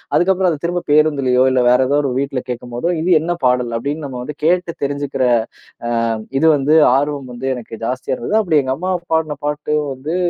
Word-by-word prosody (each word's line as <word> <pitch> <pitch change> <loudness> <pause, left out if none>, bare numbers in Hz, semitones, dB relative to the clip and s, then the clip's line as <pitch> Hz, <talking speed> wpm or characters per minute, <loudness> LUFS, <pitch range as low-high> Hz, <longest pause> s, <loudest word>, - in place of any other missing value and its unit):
அதுக்கப்புறம் 185 0 +3
அதைத் 150 -1 -5
திரும்பப் 175 0 -2
பேருந்துலயோ, 140 -4 +3
இல்ல 130 - +2
வேற 125 +1 +4
ஏதோவது 145 +2 +2
ஒரு 125 - -2
வீட்ல 140 -1 -2
கேட்கும் 120 0 -7
போதோ, 125 +8 -2
இது 170 - -1
என்ன 170 +3 -1
பாடல் 125 -2 +1
அப்டின்னு 145 +5 -4
நம்ம 130 -2 -6
வந்து 150 +2 -7
கேட்டு 175 0 +1
தெரிஞ்சுக்கிற 140 -2 -2 0.6
அ - - -2 0.5
இது 160 - +2
வந்து 145 +2 +1 0.2
ஆர்வம் 140 -2 -1
வந்து 125 +2 -5
எனக்கு 115 -2 -10
ஜாஸ்தியா 130 +1 -2
இருந்தது. 215 - -1
அப்டி 160 -7 +2
எங்க 130 0 -1
அம்மா 185 +2 -2 0.2
பாடுன 155 -3 0
பாட்டும் 150 +1 -1
வந்து, 145 +6 -5
145 Hz, 190 wpm, -18 LUFS, 130-160 Hz, 0.6 s, வேற